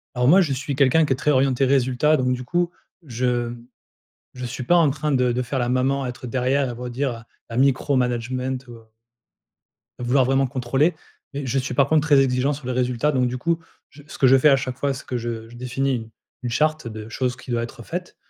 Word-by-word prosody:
Alors 125 0 +2
moi, 185 +7 +7
je 145 -6 0
suis 140 +1 -3
quelqu'un 140 +4 +4
qui 135 - +1
est - - -1
très 150 +3 +1
orienté 135 0 +2
résultats. 135 +3 +2
Donc, 125 0 +1
du 125 0 -4
coup, 175 +5 0 0.3
je 120 -2 -1 0.8
je 125 0 -7
suis 125 +1 -5
pas 175 - +4
en 165 -4 +4
train 150 +1 -2
de 125 -2 +2
de 125 +1 -1
faire 130 +3 -3
la 120 -1 0
maman, 135 +2 +1
à - - -3
être 125 +1 -9
derrière 130 +2 0
et - - -4
redire 125 -1 -4 0.2
à 115 - -6
micro 135 +1 +2
management, 125 +1 -2
ou - - -9
heu, 115 - -15 1.2
à - - -5
vouloir 130 +2 +3
vraiment 135 +1 +2
contrôler, 135 +6 +1 0.4
mais 140 0 -4
je 135 - 0
suis 130 - -4
par 140 -1 +3
contre 155 -1 +3
très 145 -3 +6
exigeant 135 +2 +1
sur 135 -3 -8
les - - -1
résultats, 125 +3 0
donc 130 -2 +1
du 125 +1 -3
coup 165 +4 0 0.3
j 145 0 -16
ce - - -10
que 135 - +5
je 135 +1 +7
fais 150 +3 +5
à 135 - +6
chaque 130 -1 -4
fois, 140 0 0
c'est 135 - -9
que 125 - -2
je 115 -1 -5
je 120 - -13
définis 130 +2 -1
u 115 -2 -5 0.4
une 120 - -2
charte 155 +1 0
de 110 0 -8
choses 125 +1 -2
qui - - -14
doit 115 -1 0
être 120 0 -8
faites 175 +8 -6
130 Hz, 240 wpm, -23 LUFS, 125-140 Hz, 1.2 s, moi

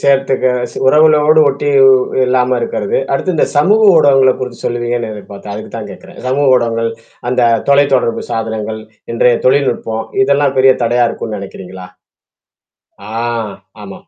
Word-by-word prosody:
சேர்த்துக்க 135 -1 +1 0.4
உறவுகளோடு 155 +2 +4
ஒட்டி 140 +1 -2 0.6
இல்லாம 125 0 +1
இருக்கிறது, 105 -3 -3 0.2
அடுத்து 180 +6 -1
இந்த 155 - +1
சமூக 205 +9 +3
ஊடகங்கள 135 -4 +4
குறித்து 125 -2 -7
சொல்லுவீங்கன்னு 120 -1 -3
எதிர்பார்த்தேன், 100 0 -10
அதுக்கு 110 - -8
தான் - - -7
கேக்கறேன். - - -13
சமூக 140 +3 0
ஊடகங்கள், 115 -2 0 0.4
அந்த 125 0 0 0.3
தொலைத்தொடர்பு 140 -4 +2
சாதனங்கள், 110 -1 -4 0.3
இன்றைய 120 +1 +2
தொழில்நுட்பம், 120 -4 0 0.2
இதெல்லாம் 140 -5 +1
பெரிய 130 0 +5
தடையா 120 +1 +1
இருக்கும்ன்னு 110 -2 -6
நெனைக்கிறீங்களா? 95 -1 -10 1.3
ஆ, - - -7 0.7
ஆமாம். - - -12
125 Hz, 125 wpm, -14 LUFS, 115-140 Hz, 1.3 s, பெரிய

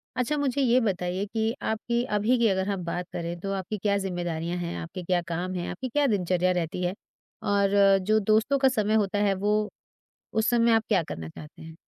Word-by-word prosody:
अच्छा 255 +4 0
मुझे 280 -1 0
ये 250 0 +4
बताइए 185 -2 -1
कि 220 +2 -1
आपकी 235 +2 -1
अभी 220 +2 +1
की 235 -1 +3
अगर 190 -1 +1
हम 195 -3 -2
बात 175 +1 -3
करें, 170 0 -4
तो 195 +3 -4
आपकी 195 +2 -3
क्या 200 0 +1
ज़िम्मेदारियाँ 175 -3 -3
हैं? 175 -1 -4
आपके 170 +2 -7
क्या 180 0 +1
काम 175 +2 -4
हैं? 175 - -3
आपकी 255 +9 -5
क्या 290 +3 +2
दिनचर्या 185 -4 +1
रहती 180 0 -2
है? 180 +1 0 0.5
और 200 -1 +4
जो 215 +3 +2
दोस्तों 220 +6 +2
का 265 - +5
समय 215 -4 0
होता 205 -1 +1
है 200 - +3
वो 210 +2 0 0.6
उस 220 0 +1
समय 235 -1 +4
आप 225 - +4
क्या 195 -5 +3
करना 80 - -7
चाहते 150 - -12
हैं? 160 0 -10
200 Hz, 205 wpm, -26 LUFS, 180-220 Hz, 0.6 s, का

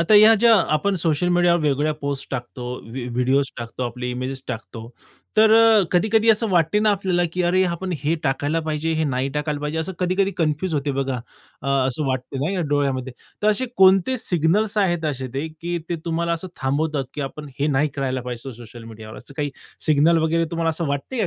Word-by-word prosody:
आता 170 +6 +3
ह्या 215 +2 +8
ज्या 235 -1 +7 0.2
आपण 195 +6 +1
सोशल 165 0 0
मीडियावर 175 -1 +3
वेगवेगळ्या 150 +1 +1
पोस्ट 140 -2 -5
टाकतो, 125 -1 -5 0.2
व्ही 125 +1 -5
व्हिडिओज 130 +3 +1
टाकतो, 120 +2 -5
आपले 125 +1 -5
इमेजेस 130 +2 -4
टाकतो, 115 -1 -7 0.5
तर 215 0 +6
अ, 225 -2 +6
कधी-कधी 220 +5 +3
असं 220 +1 +2
वाटतं 175 +3 +2
ना 215 - +4
आपल्याला, 190 -3 +1
की 180 - -1
"अरे 180 +2 +3
आपण 180 +1 -3
हे 155 +3 +1
टाकायला 145 +3 0
पाहिजे, 155 0 -2
हे 160 - 0
नाही 130 -2 -1
टाकायला 150 0 -2
पाहिजे," 150 +2 -3
असं 160 +4 -3
कधी-कधी 185 +2 +1
कन्फ्यूज 160 +2 0
होते 145 0 -1
बघा. 135 -2 -2 0.4
अ, 140 - -3 0.2
असं 135 +3 -2
वाटतं 130 +1 -3
ना 165 - 0
या 190 - -1
डोळ्यामध्ये. 135 -3 0 0.3
तर 210 - +3
असे 235 +5 0
कोणते 190 +6 +5
सिग्नल्स 200 +4 +1
आहेत 175 -5 +1
असे 130 -1 -5
ते, 140 +4 -2
की 175 +1 -2
ते 175 - -1
तुम्हाला 170 0 -1
असं 170 +3 -4
थांबवतात, 145 +1 0
की - - -4
आपण 145 +2 -7
हे 145 - +2
नाही 150 0 +2
करायला 130 -2 -1
पाहिजे 125 -1 -6
सो 135 - -7
सोशल 115 0 -12
मीडियावर, 110 -1 -10
असं 140 - -12
काही 145 -2 -1 0.4
सिग्नल 155 +2 +4
वगैरे 165 +1 +1
तुम्हाला 165 -1 0
असं 160 +1 -3
वाटतं 140 - -3
का - - +1
155 Hz, 205 wpm, -22 LUFS, 135-180 Hz, 0.5 s, ह्या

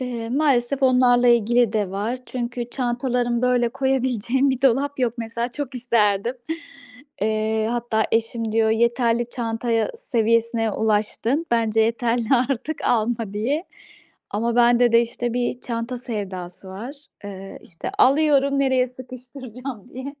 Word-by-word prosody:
Eee, 240 -3 -4
maalesef 275 -1 +1
onlarla 250 -1 +4
ilgili 235 0 +3
de 205 -4 0
var. 215 +6 -2
Çünkü 240 -1 -4
çantalarım, 245 -1 -1
böyle, 250 -1 +3
koyabileceğim 265 0 0
bir 260 0 -3
dolap 275 +2 +2
yok 240 -3 +1
mesela. 235 +1 -3
Çok 280 0 -6
isterdim. 230 -2 +1 0.9
Eee, 220 0 0
hatta 235 -2 0
eşim 225 0 -1
diyor, 225 -1 +3
"Yeterli 235 +1 +2
çantaya 230 -1 -1
seviyesine 230 - +1
ulaştın. 220 +8 0
Bence 225 -2 +2
yeterli. 230 +1 +1 0.3
Artık 280 +4 -3
alma." 225 -2 0
diye. 260 - -1 0.7
Ama 230 +3 -1
bende 240 0 +4
de, 230 - +7
işte, 240 0 -4
bir 245 0 -1
çanta 235 +1 -4
sevdası 190 -6 -6
var. 255 +10 -9 0.2
Eee, 195 -1 -8
işte, 165 - -7
alıyorum 280 0 +4
nereye 260 -2 +2
sıkıştıracağım 255 -2 -9
diye. 265 +3 -6
240 Hz, 130 wpm, -22 LUFS, 225-255 Hz, 0.9 s, de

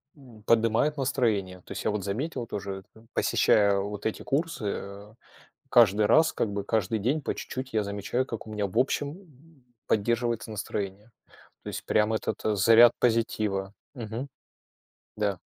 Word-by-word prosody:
м, 120 -7 -16
поднимает 115 +7 +2
настроение. 110 -9 0
То - - -16
есть - - -5
я - - +1
вот 105 -2 -3
заметил, 120 +4 -3
тоже 95 -1 -5
это, 110 +1 -18
посещая 100 -1 +3
вот 100 +1 -5
эти 110 - -2
курсы, 150 -3 -1
э, 100 +2 -6 0.5
каждый 105 -3 +5
раз, 160 +8 +5
как 105 - -1
бы, 100 -1 -2
каждый 110 0 0
день 135 +9 0
по - - -3
чуть-чуть 130 -1 -6
я 110 -1 +2
замечаю, 100 +6 -2
как 115 -2 -7
у - - -8
меня, 105 -1 -1
в 110 - -6
общем, 140 +2 0
м, 155 -5 -18 0.2
поддерживается 115 0 0
настроение. 105 +1 -5 0.5
То - - -10
есть - - -5
прям 105 +1 +2
этот 110 - -2 0.2
заряд 115 +4 +7
позитива. 105 -4 0 0.2
Мгм. 120 +3 -5 0.9
Да. 100 -4 -1
110 Hz, 160 wpm, -27 LUFS, 100-125 Hz, 0.9 s, заряд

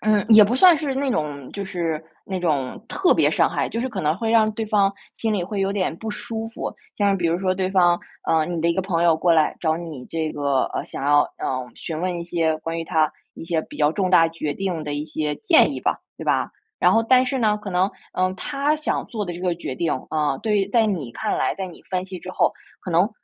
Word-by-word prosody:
嗯， 210 -2 +2
也 220 -2 +9
不 220 +4 0
算 345 +5 +7
是 285 -3 -2
那 270 0 0
种 145 - -3
就 200 - -4
是 165 -4 -3 0.2
那 190 -1 -3
种 150 -2 -1
特 380 -2 +3
别 - - +3
伤 - - +3
害， - - -1
就 230 - -3
是 260 - -1
可 200 -5 -4
能 155 +2 +1
会 225 +3 -2
让 220 -1 +4
对 220 +1 -3
方 200 -2 +3 0.2
心 225 -1 -1
里 200 -4 0
会 195 +3 -3
有 195 0 +1
点 185 -5 -1
不 220 +4 -5
舒 225 +1 -5
服。 225 - -5 0.2
像 200 -1 +2
比 175 -3 0
如 165 +1 +1
说 185 0 0
对 185 0 -1
方 175 -2 +4 0.3
嗯， 160 +2 +1
你 - - -2
的 165 - +2
一 170 - +2
个 190 - 0
朋 175 -3 0
友 170 -2 +4
过 170 +1 +3
来 155 -2 +3
找 160 -2 +1
你 160 -7 -7
这 160 -1 -2
个 140 -3 0
呃， - - -2
想 - - -6
要， 145 +1 +5 0.2
嗯， 130 -2 -3
询 160 -1 -5
问 180 -1 -1
一 - - -4
些 165 -2 0
关 165 +1 -4
于 165 - -3
他 160 -2 +2 0.2
一 - - -9
些 165 -1 0
比 - - -12
较 150 0 +4
重 185 +2 -1
大 165 -3 +6
决 160 -2 -3
定 180 -5 -3
的 150 - -4
一 145 +1 -2
些 155 -1 -2
建 365 -7 +4
议 - - -5
吧。 - - -1 0.2
对 - - -6
吧， - - +1 0.3
然 - - +4
后 225 - +4
但 255 +2 +4
是 265 +1 -1
呢 210 -2 +2
可 210 - -8
能， 185 +1 +1 0.2
嗯， 185 0 +1
他 285 +4 0
想 310 0 -2
做 215 -3 -4
的 175 - -4
这 175 - -8
个 180 -2 0
决 165 -6 -5
定， 165 +4 -1 0.2
嗯， 150 -3 0
对 215 -2 +1
于 195 - +2
在 225 +1 +3
你 160 - -3
看 - - -2
来， 130 - 0
在 190 - -4
你 175 - -12
分 185 0 -1
析 185 -1 -7
之 185 - -8
后， - - +1 0.3
可 185 - -6
能 175 +6 +3
180 Hz, 280 characters per minute, -23 LUFS, 160-210 Hz, 0.3 s, 也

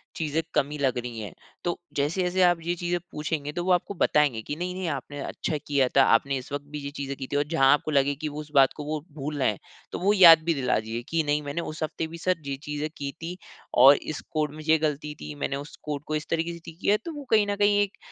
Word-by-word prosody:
चीज़ें 160 0 -1
कमी 145 +2 +1
लग 135 -3 0
रही 120 -2 -5
हैं। 105 - -7 0.3
तो 175 - -1 0.2
जैसे-जैसे 180 +6 0
आप 175 -1 +4
ये 175 +1 0
चीज़ें 175 0 -1
पूछेंगे 150 -1 -3
तो 175 - -2
वो 185 - +1
आपको 180 +3 +1
बताएँगे 150 - +2
कि 145 - -5
नहीं, 180 +2 -3
नहीं 185 -2 -3
आपने 145 0 -5
अच्छा 155 - -3
किया 140 -2 +1
था 135 - +8
आपने 135 +4 +2
इस 130 - -9
वक़्त 145 0 -4
भी 150 - -5
ये 140 - -4
चीज़ें 140 -1 -5
की 130 - -6
थी - - -1
और 145 - +3
जहाँ 135 -5 +3
आपको 150 +1 0
लगे 140 -1 +2
कि 155 +2 -4
वो 150 +1 -7
उस 150 - -12
बात 135 -1 +6
को 150 - -5
वो 155 0 -2 0.2
भूल 145 +1 -4
रहे 130 - +3
हैं 105 - -4 0.3
तो - - -4
वो 200 +3 +3
याद 170 -5 +9
भी 170 - +3
दिला 135 -7 +1
दीजिए 110 +2 -5
कि 165 -1 +2
नहीं 150 0 +1
मैंने 145 +4 -3
उस 155 -1 -5
हफ्ते 160 +1 -3
भी 165 +1 -9
सर 185 +2 +1
ये 135 - -2
चीज़ें 150 +1 -3
की 140 -1 -4
थी 175 +2 -5 0.5
और 140 +2 +10
इस 155 - -6
कोड 155 -2 -1
में 155 - -8
ये 160 - +6
गलती 150 -1 -2
थी 75 0 -6
मैंने 140 - -2
उस 145 +3 -7
कोड 145 -1 -4
को 155 - -1
इस 155 0 -3
तरीके 165 +1 -1
से 170 - -9
ठीक 165 0 -11
किया। 205 +2 +3
तो 335 - -4
वो 290 -1 -7
कहीं 215 -2 +5
न 205 - 0
कहीं 205 0 +3
एक 205 0 -2
150 Hz, 270 wpm, -26 LUFS, 140-170 Hz, 0.5 s, और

